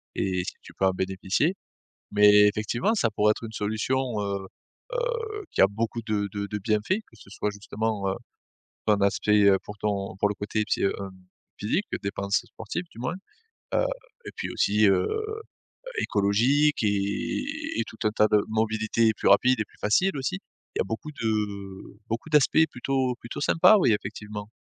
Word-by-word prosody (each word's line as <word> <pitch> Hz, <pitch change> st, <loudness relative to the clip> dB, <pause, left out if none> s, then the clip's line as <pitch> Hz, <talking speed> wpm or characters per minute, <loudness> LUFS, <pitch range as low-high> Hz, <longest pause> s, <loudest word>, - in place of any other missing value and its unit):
et 90 Hz, -2 st, 0 dB
si -, -, -4 dB
tu -, -, -14 dB
peux 95 Hz, -, 0 dB
en 95 Hz, -, +4 dB
bénéficier. 95 Hz, -, 0 dB, 0.6 s
Mais, 105 Hz, 0 st, +7 dB
effectivement, 110 Hz, -, 0 dB
ça 120 Hz, -, +2 dB
pourrait 105 Hz, +1 st, +3 dB
être 110 Hz, -, -4 dB
une 110 Hz, -, -7 dB
solution, 110 Hz, +3 st, -1 dB
heu 100 Hz, -1 st, -3 dB, 0.5 s
heu, 460 Hz, -4 st, -2 dB
qui -, -, +1 dB
a 95 Hz, -, +8 dB
beaucoup 115 Hz, +3 st, -3 dB
de 105 Hz, -2 st, 0 dB
de 100 Hz, 0 st, -3 dB
de 105 Hz, -, -3 dB
bienfaits, 110 Hz, -, 0 dB
que -, -, -20 dB
ce 100 Hz, -, -16 dB
soit 105 Hz, +1 st, -2 dB
justement, 105 Hz, 0 st, -3 dB
heu, 95 Hz, -, -1 dB, 0.7 s
un 105 Hz, -1 st, +4 dB
aspect, 105 Hz, +1 st, +3 dB
heu, 95 Hz, -, +5 dB
pour 105 Hz, 0 st, -9 dB
ton 100 Hz, -1 st, -2 dB
pour 105 Hz, -, +3 dB
le 105 Hz, -, -2 dB
côté 105 Hz, +2 st, -2 dB
psy -, -, 0 dB
heu, 100 Hz, -, +3 dB, 0.7 s
physique, 150 Hz, -, 0 dB, 0.2 s
dépense 100 Hz, 0 st, 0 dB
sportive 115 Hz, -, -6 dB
du -, -, -14 dB
moins, 130 Hz, +7 st, -2 dB, 0.6 s
heu -, -, +3 dB, 0.4 s
et -, -, -5 dB
puis -, -, -4 dB
aussi, 105 Hz, +1 st, +3 dB
heu 95 Hz, -2 st, +4 dB
heu, 435 Hz, 0 st, -3 dB, 0.7 s
écologique 120 Hz, +10 st, +2 dB
et 100 Hz, -, 0 dB, 0.4 s
et -, -, +2 dB
tout 110 Hz, -, -11 dB
un 105 Hz, -, 0 dB
tas 105 Hz, 0 st, +3 dB
de 105 Hz, -, +4 dB
mobilités 110 Hz, +1 st, +1 dB
plus -, -, -1 dB
rapides 125 Hz, +5 st, +5 dB
et -, -, -1 dB
plus -, -, -25 dB
faciles 150 Hz, -, +2 dB
aussi. 130 Hz, -8 st, -2 dB, 0.4 s
Il -, -, -2 dB
y -, -, +4 dB
a -, -, -1 dB
beaucoup 150 Hz, +7 st, -4 dB
de 115 Hz, -, +1 dB, 0.8 s
beaucoup 115 Hz, +8 st, -3 dB
d'aspects 150 Hz, +2 st, +5 dB
plutôt 130 Hz, 0 st, -1 dB
plutôt 120 Hz, -, -6 dB
sympa. 165 Hz, +8 st, +6 dB
Oui, 125 Hz, -, +4 dB
effectivement. 105 Hz, 0 st, -5 dB
105 Hz, 180 wpm, -26 LUFS, 100-125 Hz, 0.8 s, a